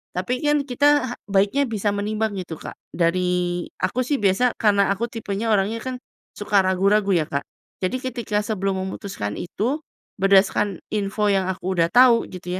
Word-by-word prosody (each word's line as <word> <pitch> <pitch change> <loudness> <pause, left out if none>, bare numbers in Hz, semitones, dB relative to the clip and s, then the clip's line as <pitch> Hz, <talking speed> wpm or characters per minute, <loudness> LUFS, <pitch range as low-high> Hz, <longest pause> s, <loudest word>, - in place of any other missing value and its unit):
tapi 215 +8 -1
kan 295 -1 +3
kita 280 -1 +2
baiknya 200 +8 +2
bisa 215 -3 -1
menimbang 215 +1 -1
gitu 175 -3 -6
Kak - - -9 0.2
dari 175 0 0
aku 185 +7 -1
sih 285 +4 0
biasa 205 +5 +2
karena 200 -3 +3
aku 210 +4 -2
tipenya 220 -1 -3
orangnya 210 +3 +1
kan 260 0 -4 0.4
suka 205 -1 +2
ragu-ragu 195 +2 +2
ya 165 -4 +2
Kak, 140 0 -2 0.4
jadi 185 +7 0
ketika 235 -5 -2
sebelum 195 -3 -1
memutuskan 190 - -5
itu, 225 - -2 0.4
berdasarkan 195 0 +3
info 210 0 0
yang 195 -1 +1
aku 185 +1 -4
udah 165 -1 +4
tau, 245 -2 +6
gitu 180 0 -6
200 Hz, 155 wpm, -22 LUFS, 185-230 Hz, 0.4 s, tau